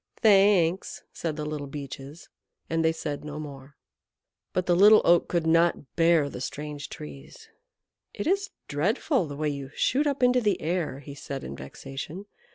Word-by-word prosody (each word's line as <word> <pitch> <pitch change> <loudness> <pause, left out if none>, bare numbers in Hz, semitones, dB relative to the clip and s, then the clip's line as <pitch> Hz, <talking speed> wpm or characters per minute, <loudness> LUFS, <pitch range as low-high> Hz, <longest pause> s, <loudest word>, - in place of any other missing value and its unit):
"Thanks," 195 -4 +4
said 160 -3 -3
the 150 -1 -4
Little 150 -2 -4
Beeches, 140 +2 -8 0.4
and 165 0 +1
they 160 - +4
said 150 -3 -5
no 150 0 -6
more. 140 -2 -9 0.8
But 185 - -1
the 175 - +3
Little 210 +4 +7
Oak 170 0 +5
could 170 -2 0
not 165 -6 +2
bear 165 -3 +4
the 125 - -7
strange 145 +1 -5
Trees. 70 -2 -10 0.6
"It 205 - -5
is 395 +3 +1 0.2
dreadful 185 - 0
the 145 -1 -7
way 155 0 0
you 140 -2 -5
shoot 290 +3 +2
up 280 -2 -1
into 250 0 +4
the 210 -3 +1
air," 160 -5 -2
he 140 0 -9
said 140 -1 -6
in 70 - -6
vexation. 135 - -8
160 Hz, 165 wpm, -27 LUFS, 145-185 Hz, 0.8 s, Little